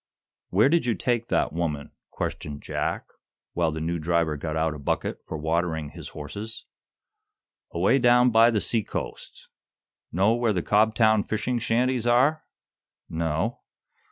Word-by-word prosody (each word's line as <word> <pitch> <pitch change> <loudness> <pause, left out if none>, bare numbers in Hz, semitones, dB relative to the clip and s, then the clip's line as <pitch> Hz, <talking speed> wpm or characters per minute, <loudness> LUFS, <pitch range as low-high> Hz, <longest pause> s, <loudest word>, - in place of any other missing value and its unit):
"Where 105 +7 +4
did 165 -3 +2
you 115 - +2
take 120 -2 -1
that - - 0
woman?" 80 -4 -3 0.2
questioned 75 -1 -5
Jack, - - -2 0.5
while 85 -2 +1
the 80 - -4
new 85 +2 -2
driver 85 -1 +1
got 80 +2 -4
out 80 0 +1
a 75 - -8
bucket 70 - -2
for 80 - -4
watering 80 0 -1
his - - -9
horses. 100 +10 -8 1.0
"Away 135 - +2
down 125 0 +5
by 115 +1 +6
the 110 -3 +1
sea 115 -3 +1
coast. - - -7 0.6
Know 95 +6 +3
where 120 -2 +1
the 90 -3 -1
Cobtown 110 0 +3
fishing 120 +3 -1
shanties 120 +1 0
are?" 135 +6 +3 0.6
"No." 80 +7 -1
105 Hz, 145 wpm, -25 LUFS, 80-120 Hz, 1.0 s, by